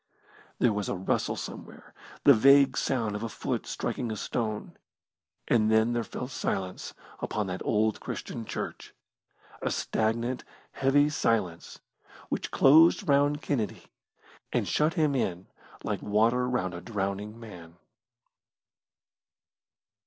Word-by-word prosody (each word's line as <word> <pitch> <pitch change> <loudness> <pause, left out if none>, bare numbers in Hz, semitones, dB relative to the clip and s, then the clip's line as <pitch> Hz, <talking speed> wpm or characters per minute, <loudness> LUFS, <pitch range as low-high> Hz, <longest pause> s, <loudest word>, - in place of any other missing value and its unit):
There 120 -3 +3
was 105 -1 -2
a - - -1
rustle 95 +1 -1
somewhere - - -9 0.3
the 140 - +8
vague 140 +3 +6
sound 115 -6 -1
of 105 - -4
a 115 - -3
foot - - -3
striking 115 - -3
a - - -3
stone 110 -1 -3 0.7
and 110 -2 +3
then 110 +2 +3
there 120 -1 0
fell 125 - -6
silence 95 -7 -4 0.2
upon 105 - -2
that 90 -1 -5
old 110 0 +1
Christian 115 - -6
church - - -6 0.7
a - - 0
stagnant 115 +3 -1 0.3
heavy 140 +2 +3
silence 110 - -1 0.5
which - - -2
closed 160 +7 +5
round 145 +1 +3
Kennedy 115 -8 -2 0.7
and - - 0
shut 155 +2 +1
him 155 -3 +2
in 95 -8 -1 0.4
like - - -2
water 115 +4 +2
round 95 -7 -1
a 85 - -6
drowning 105 +1 -4
man. 90 -7 -11
115 Hz, 125 wpm, -28 LUFS, 105-135 Hz, 0.7 s, the